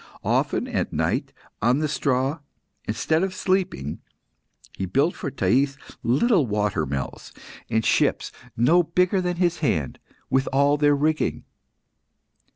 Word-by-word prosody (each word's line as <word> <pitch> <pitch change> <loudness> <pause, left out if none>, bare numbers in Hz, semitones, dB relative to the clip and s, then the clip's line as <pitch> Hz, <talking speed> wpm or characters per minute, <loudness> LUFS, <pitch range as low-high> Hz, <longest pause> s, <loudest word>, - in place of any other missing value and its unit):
Often - - +1
at - - -1
night, - - -1 0.3
on 120 +5 +3
the 155 +1 0
straw, 135 +1 0 0.5
instead 160 +9 0
of 190 0 -2
sleeping, 185 - -1 0.7
he 95 - -3
built 140 - +2
for - - -4
Thais 135 +2 +1 0.2
little 150 - +2
water 105 -7 0
mills, 65 -1 -5 0.4
and 110 0 0
ships - - +1 0.3
no 155 +10 +5
bigger 180 +3 +1
than 180 -1 -1
his 175 -1 0
hand, 80 - -1 0.3
with 135 0 +1
all 140 +2 +3
their 145 0 +4
rigging. 155 +2 0
140 Hz, 130 wpm, -24 LUFS, 115-170 Hz, 0.7 s, no